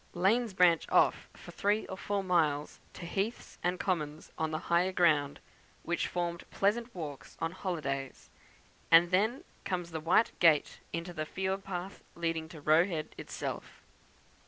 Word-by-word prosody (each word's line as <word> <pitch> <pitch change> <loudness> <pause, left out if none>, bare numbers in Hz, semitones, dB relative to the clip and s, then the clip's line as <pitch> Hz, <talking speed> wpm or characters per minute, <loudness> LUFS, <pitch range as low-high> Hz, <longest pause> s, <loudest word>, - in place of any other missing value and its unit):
Lanes 200 +4 +2
branch 175 -3 +4
off - - +3
for - - -11
three 205 +2 +1
or 190 - -6
four 200 +1 -2
miles 155 -5 +1
to 175 - -8
heaths 200 +6 -3
and 180 0 0
commons 155 -5 -2
on 160 - -1
the 155 - -2
higher 175 +2 +2
ground, 150 -6 +2 0.4
which 170 0 -1
formed 170 -1 -3
pleasant 230 +4 0
walks 150 -5 -7
on 165 - -1
holidays, 150 -8 -4 0.6
and 170 +1 +7
then 220 - +2 0.2
comes 175 -2 -3
the 160 - -3
white 170 +8 +3
gate 160 -4 +4
into 165 +2 -4
the 155 -2 -4
field 190 +2 -2
path 190 0 -6
leading 165 -1 -2
to 160 - -10
Roe 155 +4 +5
Head 160 -5 -4
itself. - - -6
175 Hz, 155 wpm, -31 LUFS, 160-190 Hz, 0.6 s, and